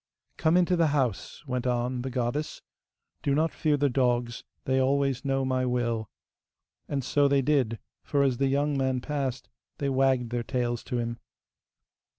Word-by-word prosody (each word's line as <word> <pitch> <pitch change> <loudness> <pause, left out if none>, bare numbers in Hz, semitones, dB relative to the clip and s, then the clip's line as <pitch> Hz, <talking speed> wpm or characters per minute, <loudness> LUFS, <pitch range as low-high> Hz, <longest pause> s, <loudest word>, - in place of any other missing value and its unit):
'Come 160 +2 +3
into 180 0 +3
the 165 -2 +3
house,' 125 -2 -2
went 125 -2 -2
on 125 0 0
the 130 - -3
goddess; 130 +4 -2 0.6
'do 140 - +1
not 160 +2 +1
fear 150 -2 +1
the 145 0 +2
dogs, 120 -2 0 0.2
they 130 0 +2
always 135 -1 +1
know 135 -1 0
my 130 -1 0
will.' 120 -3 -1 0.8
And 140 -2 -1
so 145 +3 +3
they 140 -1 +3
did, 130 -6 +1 0.2
for 140 -1 +1
as 130 -3 +1
the 135 +1 +2
young 145 +2 +1
man 130 -1 +1
passed 135 -1 -3 0.3
they 140 - -1
wagged 130 -3 +2
their 120 -1 -1
tails 120 -1 -2
to 125 - -2
him. 115 0 -3
130 Hz, 165 wpm, -27 LUFS, 125-140 Hz, 0.8 s, Come